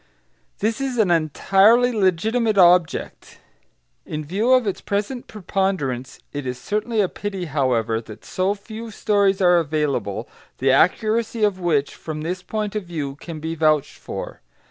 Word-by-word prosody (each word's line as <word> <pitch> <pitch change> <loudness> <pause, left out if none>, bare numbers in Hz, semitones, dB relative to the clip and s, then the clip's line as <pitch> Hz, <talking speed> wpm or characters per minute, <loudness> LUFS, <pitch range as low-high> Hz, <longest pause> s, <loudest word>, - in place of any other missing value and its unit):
This 225 +4 -1
is 265 -2 -2
an 210 -6 +3
entirely 195 - +4
legitimate 215 +3 +1
object. 175 -2 +3 0.7
In 155 0 -5
view 205 - 0
of 255 -2 +5
its 200 - -2
present 210 +5 -3
preponderance, 180 - -2 0.2
it 145 -2 -4
is 125 0 -3
certainly 215 - -1
a 195 - +2
pity, 195 -1 -5
however, 125 -7 0
that 110 -2 -12
so 190 +2 0
few 220 +3 -9
stories 200 -2 +1
are 180 -1 +5
available, 145 - -1 0.3
the 135 +1 +2
accuracy 215 - +2
of 205 -3 +2
which, 155 -6 0
from 155 -1 -6
this 180 +4 -3
point 215 +2 -4
of 210 -3 -2
view, 155 -5 -4
can 160 0 -8
be 160 +1 -4
vouched 155 -2 +1
for. - - -7
185 Hz, 150 wpm, -22 LUFS, 150-215 Hz, 0.7 s, of